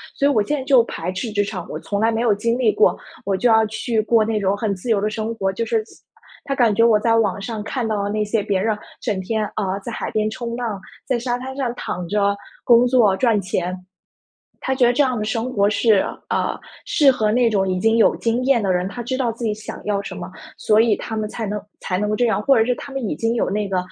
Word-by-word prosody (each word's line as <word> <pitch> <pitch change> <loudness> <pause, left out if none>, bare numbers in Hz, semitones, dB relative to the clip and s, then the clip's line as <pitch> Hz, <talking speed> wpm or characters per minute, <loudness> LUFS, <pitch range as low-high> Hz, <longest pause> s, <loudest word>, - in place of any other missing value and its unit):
所 275 - 0
以 285 - +3
我 220 - +3
现 295 +8 -1
在 265 - -4
就 265 -3 +5
排 175 +3 -4
斥 205 +5 -4
职 205 -1 +1
场， 185 -4 -5
我 - - -4
从 200 - -3
来 225 +2 +3
没 225 0 -1
有 230 -3 +3
经 230 +4 0
历 230 -4 +3
过， 215 - +3 0.3
我 195 -1 +1
就 245 +5 +2
要 220 -1 +5
去 220 +1 -1
过 225 0 +3
那 215 -1 -1
种 195 0 +1
很 205 -1 -1
自 195 +6 -7
由 205 -3 +2
的 210 - 0
生 220 +1 -3
活， 195 -2 -1
就 230 +4 -3
是 225 -1 0 0.6
他 275 - -2
感 235 -5 +3
觉 230 +2 +4
我 225 -2 +5
在 230 +1 +2
网 205 -3 +1
上 215 +1 -4
看 245 +1 -3
到 205 -2 -1
那 210 +1 -1
些 210 +1 0
别 200 -2 0
人， 215 0 0 0.2
整 200 -3 -1
天， 215 +3 -1
啊， 195 -2 -1
在 235 - -7
海 - - -4
边 215 0 0
冲 235 +1 -5
浪， 225 -5 -4 0.2
在 255 -3 0
沙 245 0 -1
滩 265 +1 -7
上 245 -3 -1
躺 180 -6 -5
着 200 0 +1 0.3
工 240 +1 +5
作 230 -6 +4
赚 230 -5 +2
钱。 180 -1 -2 0.8
他 265 - -1
觉 260 -2 +3
得 240 - +4
这 285 +3 +3
样 255 -2 0
的 210 - -2
生 225 +3 -2
活 205 -2 +2
是， 215 -2 +3 0.3
呃， - - -1 0.3
适 280 -4 +4
合 215 -3 0
那 240 +1 +3
种 195 -3 +1
已 185 -1 0
经 225 +3 +2
有 230 - +4
经 235 +2 -1
验 265 -3 +3
的 195 -2 +1
人， 180 +1 0
他 240 - -7
知 260 +2 -2
道 255 -3 0
自 230 +1 -6
己 215 -1 0
想 215 - -8
要 200 -1 -1
什 - - -7
么， - - -6 0.3
所 215 0 +3
以 225 -2 +3
他 220 - -6
们 215 -1 -2
才 225 0 -5
能 205 0 -3 0.2
才 180 - -3
能 210 +2 -1
够 215 - 0
这 245 - +2
样。 220 -3 +1
或 270 +2 +4
者 220 - +4
是 250 +2 +1
他 275 - -9
们 265 -5 -3
已 - - -1
经 225 +8 -1
有 - - 0
那 205 +1 -1
个， 190 - -1
220 Hz, 290 characters per minute, -21 LUFS, 205-235 Hz, 0.8 s, 就